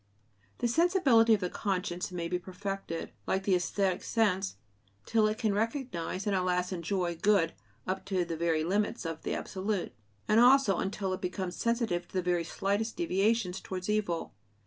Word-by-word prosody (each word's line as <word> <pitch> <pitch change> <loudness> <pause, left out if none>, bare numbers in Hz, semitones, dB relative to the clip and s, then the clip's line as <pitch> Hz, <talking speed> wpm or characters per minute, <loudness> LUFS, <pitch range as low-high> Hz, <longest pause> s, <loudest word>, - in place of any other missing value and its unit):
The - - 0
sensibility 260 - +4
of 205 - -5
the 180 - -1
conscience 185 -3 -2
may 170 -2 -3
be 180 +1 -1
perfected, 190 -2 -5 0.2
like 190 0 0
the 195 - +2
æsthetic 185 +1 +1
sense, 200 -4 +1 0.5
till 220 -2 +3
it 215 0 -1
can 220 -3 +1
recognize 210 - -2
and 205 -2 +1
at 185 - +1
last 180 0 0
enjoy 175 0 -1
"good," 195 -4 +3 0.3
up 190 +1 -2
to 185 -3 0
the 165 -1 -3
very 160 -1 +1
limits 200 +2 0
of 165 -1 -4
the - - -2
absolute, 195 0 -3 0.3
and 215 +1 +5
also 245 -5 +6
until 190 0 -2
it 185 - -5
becomes 185 0 -3
sensitive 230 -7 0
to - - -24
the 185 - +1
very 175 -1 +1
slightest 200 +6 -1
deviations 215 - +1
towards 185 +2 -4
evil. 195 - -1
195 Hz, 170 wpm, -30 LUFS, 180-215 Hz, 0.5 s, also